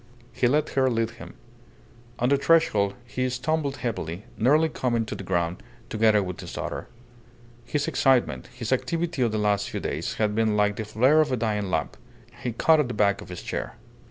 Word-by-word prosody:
He 125 - +2
let 150 +5 +2
her 130 -1 +2
lead 115 -2 0
him. - - -12 0.8
On 125 - +1
the 140 - +4
threshold 110 -11 +3
he 130 +1 -2
stumbled 140 +3 -1
heavily, 95 -4 -3
nearly 145 +9 +4
coming 120 -6 -1
to - - -5
the - - -6
ground 85 -2 -1 0.3
together 110 -2 +3
with 90 -1 -6
his - - -8
daughter. - - -4 0.8
His 145 +3 -1
excitement, 130 -3 +2
his 120 -2 -6
activity 165 +2 -1
of 120 -3 +2
the 110 - -1
last 105 -2 +1
few - - -4
days, - - -3
had 105 -1 0
been 110 -1 +1
like 105 0 +2
the 110 - -3
flare 130 +9 +4
of 150 -3 0
a 130 - +1
dying 105 -3 -1
lamp. 80 -4 -2 0.4
He 125 - -2
caught 155 +7 +4
at 150 - +2
the 120 - -5
back 100 -2 +2
of - - -11
his 90 - -7
chair. - - -4
115 Hz, 195 wpm, -25 LUFS, 105-135 Hz, 0.8 s, the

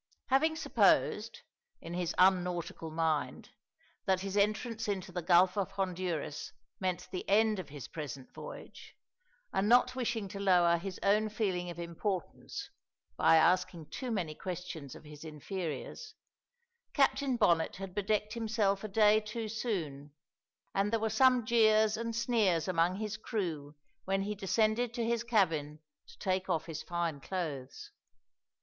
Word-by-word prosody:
Having 315 +5 +3
supposed, 315 - +2 0.4
in 165 - -8
his 175 -1 -2
unnautical 180 -3 +2
mind, 155 -5 -1 0.5
that 190 -1 +2
his 195 0 -4
entrance 215 +2 0
into 195 -2 -3
the 180 0 -3
Gulf 180 +2 +4
of 200 -3 -1
Honduras 180 -6 -3 0.3
meant 180 -2 -2
the 185 - -3
end 215 0 +4
of 165 -6 -7
his 140 -4 -8
present 140 -4 -7
voyage, - - -10 0.6
and 195 +2 +1
not 245 +1 +5
wishing 230 -5 -2
to 200 0 -7
lower 175 -3 +4
his 190 +1 -6
own 215 +2 +3
feeling 190 -5 -1
of 170 - -7
importance 175 +2 -4 0.4
by - - +5
asking 165 -1 +2
too 255 - -4
many 180 -9 -2
questions 165 -5 -6
of - - -12
his 150 0 -11
inferiors, 165 - -6 0.8
Captain 275 -2 +2
Bonnet 170 -7 +3
had 195 -1 -7
bedecked 210 +1 0
himself 220 -4 0
a - - -2
day 210 +1 +5
too 220 +1 -5
soon, 165 - -4 0.6
and 200 +1 +1
there 230 - +2
were 220 0 -1
some 255 +1 +4
jeers 220 -1 +4
and 230 0 -3
sneers 220 -8 +2
among 175 0 +2
his 210 0 -4
crew 165 -10 -4 0.3
when 195 0 0
he 210 +1 -2
descended 215 +4 +1
to 235 -2 -1
his 235 0 0
cabin 165 -10 +1 0.3
to - - -15
take 190 0 -1
off 165 -3 0
his 160 -2 -5
fine 170 -4 -2
clothes. 150 -7 -5
190 Hz, 145 wpm, -32 LUFS, 170-220 Hz, 0.8 s, not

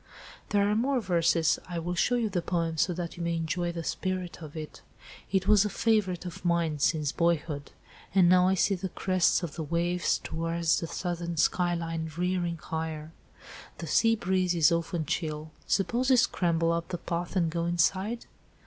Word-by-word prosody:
"There 200 -1 +2
are 205 - +2
more 260 +4 +1
verses; 170 -5 +2
I 175 - -4
will 170 +2 -2
show 245 +8 +2
you 235 -2 +1
the 185 -4 -1
poem 165 -2 -1
so 180 - +2
that 175 -1 -5
you 170 - -4
may 170 0 0
enjoy 170 +2 -1
the 170 -1 -5
spirit 185 0 -3
of 155 0 -9
it. 155 -1 -8 0.5
It 190 -1 +1
was 210 -1 +6
a 210 - -1
favourite 200 -6 +1
of 180 +1 -7
mine, 170 -3 +1
since 150 -1 +1
boyhood. 160 -4 -1 0.5
And 185 -3 +6
now 180 0 +5
I 190 - +3
see 195 +2 +2
the 190 0 -3
crests 185 0 +1
of 160 -4 -4
the 170 - -5
waves 170 +3 0
towards 165 0 -1
the 165 - -4
southern 170 -1 -4
skyline, 165 -1 0
rearing 175 -1 -1
higher. 160 -1 -5 0.7
The - - -6
sea 225 0 +3
breeze 185 -3 0
is 160 -2 +5
often 170 -1 -1
chill. 155 0 -3 0.2
Suppose 240 +6 +1
we 260 - +6
scramble 170 -8 +2
up 170 0 -1
the 175 - -4
path 170 +2 -4
and 170 -3 +2
go 170 0 -1
inside?" 190 +7 0
175 Hz, 185 wpm, -28 LUFS, 165-185 Hz, 0.7 s, was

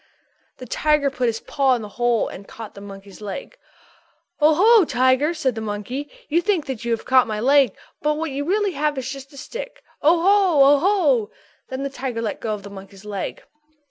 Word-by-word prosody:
_" - - -51
The 255 - -9
tiger 300 +2 +1
put 255 -2 -1
his 225 -1 -2
paw 270 -2 +1
into 235 - -5
the 210 - -8
hole 240 +1 +1
and 195 - -10
caught 225 -2 -9
the 200 - -11
monkey's 195 0 -11
leg. 205 - -7 0.8
"Oh, 305 +1 +5
ho, 435 +4 +6
Mr. - - -6
Tiger!" 260 +5 +3
said 265 -5 0
the 225 - -5
monkey. 220 +7 -5 0.2
"You 330 +3 +2
think 350 -4 0
that 260 -3 -5
you 235 - -3
have 230 -1 -1
caught 255 -1 +4
my 215 -1 -3
leg 270 -2 +4 0.3
but 300 +1 +1
what 325 -1 -3
you 280 +2 -3
really 400 +5 +1
have 300 -3 -1
is 260 -1 -3
just 270 0 -7
a 275 - -23
little 280 - -9
stick. - - -8 0.2
Oh, 330 +3 +4
ho! 350 -7 +5
Oh, 285 - +3
ho!" 300 - +2 0.4
Then 260 +1 -4
the 275 - -2
tiger 255 -3 -4
let 215 - -3
go 215 -2 -2
of 200 - -11
the 200 - -10
monkey's 195 0 -12
leg. 200 -2 -5
265 Hz, 225 wpm, -22 LUFS, 225-300 Hz, 0.8 s, ho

